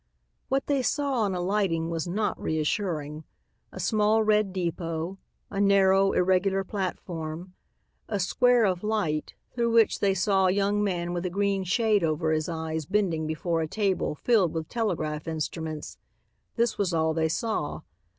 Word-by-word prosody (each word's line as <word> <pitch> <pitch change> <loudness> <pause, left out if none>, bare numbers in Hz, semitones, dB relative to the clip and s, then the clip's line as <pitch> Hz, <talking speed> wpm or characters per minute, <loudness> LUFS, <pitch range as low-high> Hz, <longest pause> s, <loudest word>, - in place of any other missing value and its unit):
What 270 0 +1
they 280 -2 +1
saw 275 -1 0
on 200 -3 0
alighting 175 -3 0
was 165 0 -2
not 210 +5 -1
reassuring. 155 -1 -2 0.5
A - - -9
small 215 0 +2
red 210 -2 +2
depot, 170 0 -3 0.3
a 200 0 -1
narrow, 195 -1 +4
irregular 190 +1 +2
platform, 180 -3 -5 0.6
a 205 - -1
square 245 +5 +3
of 185 -1 0
light 205 -9 -1 0.2
through 235 -1 0
which 230 -2 +4
they 195 -1 +2
saw 190 0 +2
a - - +3
young 200 +1 +1
man 175 -3 -1
with 175 0 -2
a - - -2
green 200 +1 0
shade 210 +1 +2
over 160 0 0
his 155 0 0
eyes 160 -2 -3
bending 180 -6 0
before 165 +1 -1
a 160 - -1
table 195 -3 -1
filled 200 -2 +2
with 160 -1 -3
telegraph 165 -10 -2
instruments; 160 -1 -4 0.6
this 235 -1 0
was 185 -4 +1
all 160 0 +2
they 160 0 +1
saw. 220 +7 -2
185 Hz, 155 wpm, -27 LUFS, 160-210 Hz, 0.6 s, narrow